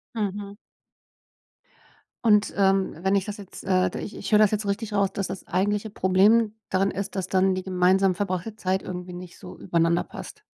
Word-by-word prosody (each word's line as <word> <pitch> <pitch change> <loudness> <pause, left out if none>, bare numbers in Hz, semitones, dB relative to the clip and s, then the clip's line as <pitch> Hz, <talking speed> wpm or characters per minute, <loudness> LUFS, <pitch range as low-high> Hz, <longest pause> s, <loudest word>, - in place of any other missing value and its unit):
Mhm. 205 -1 -3 1.7
Und, 210 -2 +4
ähm, 195 -1 +2
wenn 190 +1 +2
ich 195 -1 +1
das 210 0 -6
jetzt, 200 -2 -10
äh, 185 -1 +2
da - - -6
ich - - -7
ich - - -6
höre 210 - +6
das 215 -2 +5
jetzt 215 0 -1
richtig 205 +2 -2
raus, 200 -1 +2
dass 195 - -2
das 190 -1 -7
eigentliche 205 +4 0
Problem 205 +3 +3 0.2
darin 195 +1 +1
ist, 200 0 -5
dass 190 -2 -2
dann 190 0 +2
die 185 - -4
gemeinsam 185 0 +3
verbrachte 195 +2 -3
Zeit 190 -2 -1
irgendwie 180 0 -6
nicht 175 0 -9
so - - -11
übereinander 170 -1 +1
passt? - - -10
195 Hz, 190 wpm, -25 LUFS, 185-205 Hz, 1.7 s, höre